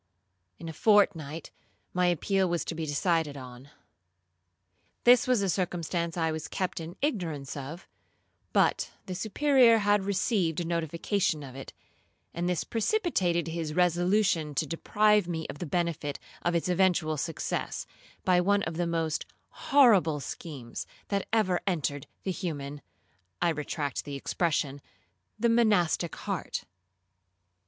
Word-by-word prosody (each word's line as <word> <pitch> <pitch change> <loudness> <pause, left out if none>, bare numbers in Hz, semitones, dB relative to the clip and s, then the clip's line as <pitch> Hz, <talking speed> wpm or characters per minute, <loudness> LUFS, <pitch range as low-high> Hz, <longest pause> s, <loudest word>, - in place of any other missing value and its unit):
In 165 - -8
a 160 - -5
fortnight 165 -6 +2 0.4
my 180 0 +2
appeal 185 +2 +1
was 170 -1 -1
to - - -3
be 160 -1 -4
decided 150 0 0
on; 130 +1 -10 1.3
this 245 +1 +6
was 250 -5 +3
a - - +1
circumstance 170 -2 -1
I 160 -1 +1
was 155 0 -4
kept 185 -1 -2
in 165 +2 -7
ignorance 165 - -2
of, 145 +5 -7 0.6
but - - +2 0.2
the 185 - -5
Superior 235 +4 +4
had 205 -1 +2
received 190 -4 0
a 175 - -2
notification 170 0 -1
of 130 -2 -9
it, 135 - -8 0.6
and 175 +1 -1
this 180 -3 0
precipitated 205 - 0
his 160 -2 -3
resolution 175 -3 +2
to 155 - +1
deprive 210 +5 +2
me 160 -2 -3
of 145 - -12
the 175 - -4
benefit 165 -3 -1 0.2
of 175 0 0
its 170 - 0
eventual 180 -3 +2
success, 155 +2 -3 0.4
by 180 -2 +4
one 200 +2 +2
of 160 0 -4
the 175 -1 0
most 165 -2 -1 0.2
horrible 205 - +4
schemes 135 -4 -7 0.2
that 200 -1 -1
ever 205 -5 +2
entered 145 -6 -1 0.2
the 190 - -1
human 145 -6 -4 0.6
(I 175 - +2
retract 150 -2 -3
the 145 -1 -5
expression) 145 -1 -1 0.6
the 235 - +3
monastic 205 -8 +2
heart. - - -4
170 Hz, 135 wpm, -29 LUFS, 155-195 Hz, 1.3 s, this